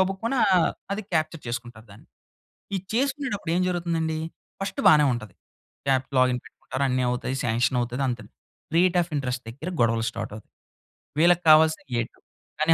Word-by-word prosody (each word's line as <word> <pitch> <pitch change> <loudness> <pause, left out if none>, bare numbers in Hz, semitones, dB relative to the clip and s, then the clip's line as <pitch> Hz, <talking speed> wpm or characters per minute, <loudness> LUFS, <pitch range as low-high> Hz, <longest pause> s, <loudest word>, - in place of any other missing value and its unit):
గబుక్కున 195 +7 0 0.6
అది 210 +2 -3
క్యాప్చర్ 155 0 0
చేసుకుంటారు 120 -1 -6
దాన్ని. 100 - -15 0.7
ఈ - - +1 0.2
చేసుకునేటప్పుడేం 250 - 0
జరుగుతుందండి? 165 -3 -1 0.4
ఫస్ట్ 195 0 -3
బానే 150 -1 +7
ఉంటది. 110 -4 -6 0.6
యాప్ 130 0 +1
లాగిన్ 130 -1 +3
పెట్టుకుంటారు. 130 - -5
అన్నీ 125 0 +1
అవుతాయి. 125 +2 -2
సాంక్షన్ 120 +2 +1
అవుతది 125 +3 -2
అంతె. 120 -4 -3 0.5
రేట్ 180 +1 +4
అఫ్ 170 0 -5
ఇంట్రెస్ట్ 125 -2 -2
దగ్గర 145 +9 -6
గొడవలు 115 -1 +2
స్టార్ట్ 115 -2 -5
అవుతాయి. 105 - -13 0.7
వీళ్ళకి 175 +1 +5
కావాల్సింది 155 -4 +4
8. 115 - -7 0.4
కానీ 160 +1 +5
140 Hz, 140 wpm, -25 LUFS, 120-175 Hz, 0.7 s, బానే